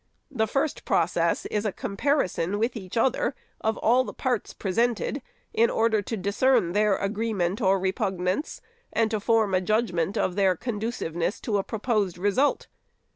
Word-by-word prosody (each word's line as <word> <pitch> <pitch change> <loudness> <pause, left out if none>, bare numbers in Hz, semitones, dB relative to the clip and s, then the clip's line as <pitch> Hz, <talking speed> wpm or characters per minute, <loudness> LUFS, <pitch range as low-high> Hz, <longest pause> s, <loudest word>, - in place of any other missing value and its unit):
The 220 -5 0
first 275 +4 -1
process - - +1
is 210 -1 -1
a 210 - 0
comparison 200 - -1
with 230 +4 0
each 190 -1 -6
other 265 - +1 0.3
of 220 0 +1
all 245 +3 +3
the - - -8
parts 250 -5 -1
presented, 230 +6 -1 0.3
in 230 +1 +4
order 225 -2 +2
to 225 +3 -4
discern 200 0 +2
their 210 +1 +3
agree 220 +3 -2
ment 185 +2 -1
or 195 -1 +4
repugnance, 190 - -1 0.3
and 225 0 +1
to 215 - 0
form 220 -1 +2
a 185 - +3
judgment 195 -3 0
of 180 - 0
their 195 -2 +3
conduciveness 205 -5 -3
to 210 -3 0
a - - -1
proposed 210 -5 -1
result. 205 +10 +1
215 Hz, 160 wpm, -26 LUFS, 190-230 Hz, 0.3 s, in